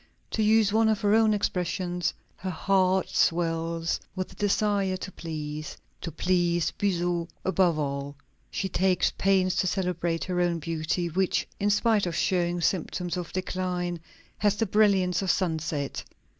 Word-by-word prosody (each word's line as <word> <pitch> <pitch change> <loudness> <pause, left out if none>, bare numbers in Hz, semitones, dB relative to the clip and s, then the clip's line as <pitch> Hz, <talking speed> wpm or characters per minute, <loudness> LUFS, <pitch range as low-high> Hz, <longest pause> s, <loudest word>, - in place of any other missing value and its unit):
To 220 - 0
use 215 -1 +4
one 220 0 +4
of 215 -2 +1
her 205 -1 +3
own 220 0 +5
expressions, 180 -3 -1 0.3
"her 190 - -4
heart 185 +1 +2
swells 165 0 0 0.2
with 185 -1 -3
the - - -14
desire 200 -1 +1
to 190 - -7
please," 155 -3 -6 0.2
to 165 - -5
please 175 -1 +1
Buzot 175 -2 -1 0.2
above 185 -3 +3
all; 140 -1 -3 0.3
she 195 - -2
takes 185 0 +2
pains 190 -1 +2
to 185 - +2
celebrate 175 -3 -1
her 180 -1 -1
own 175 -1 +1
beauty, 165 +2 -2
which, 185 +3 0
in 205 - +1
spite 210 -1 +2
of 170 - -3
showing 175 -1 +1
symptoms 175 +1 -1
of 180 -2 -5
decline, 180 -1 -2 0.4
has 205 0 +3
the 225 - 0
brilliance 195 -3 +3
of 190 - -2
sunset. 160 -6 -1
180 Hz, 150 wpm, -27 LUFS, 170-195 Hz, 0.4 s, own